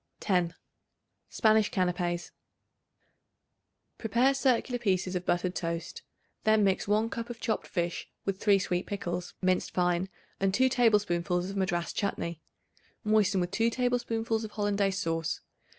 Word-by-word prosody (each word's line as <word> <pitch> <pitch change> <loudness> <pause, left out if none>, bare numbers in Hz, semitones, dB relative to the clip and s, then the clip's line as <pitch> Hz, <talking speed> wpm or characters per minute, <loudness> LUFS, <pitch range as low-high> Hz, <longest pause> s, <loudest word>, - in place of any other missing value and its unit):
10. 180 -4 +1 0.7
Spanish 220 -2 +3
Canapes. 175 -2 -1 1.7
Prepare 240 +5 +3
circular 255 -2 +1
pieces 190 -4 0
of 180 0 -3
buttered 175 +1 +1
toast. 170 -1 -4 0.4
Then 215 -1 +4
mix 195 0 +1
1 215 +2 +2
cup 230 +1 -4
of 235 -1 -7
chopped 220 - -2
fish 175 -2 -2 0.2
with 195 -1 -2
3 205 -2 +5
sweet 180 -1 -1
pickles 180 -3 -4
minced 185 0 +1
fine, 180 +1 +1 0.3
and 195 0 +1
2 260 +2 +4
tablespoonfuls 195 -7 +2
of - - -7
Madras 175 -3 -1
chutney; 170 -5 -2 0.6
moisten 210 -3 +3
with 175 0 -1
2 225 +4 +2
tablespoonfuls 230 -2 0
of 220 - -5
Hollandaise 200 -2 0
sauce. 165 -4 -1
195 Hz, 135 wpm, -29 LUFS, 180-220 Hz, 1.7 s, 3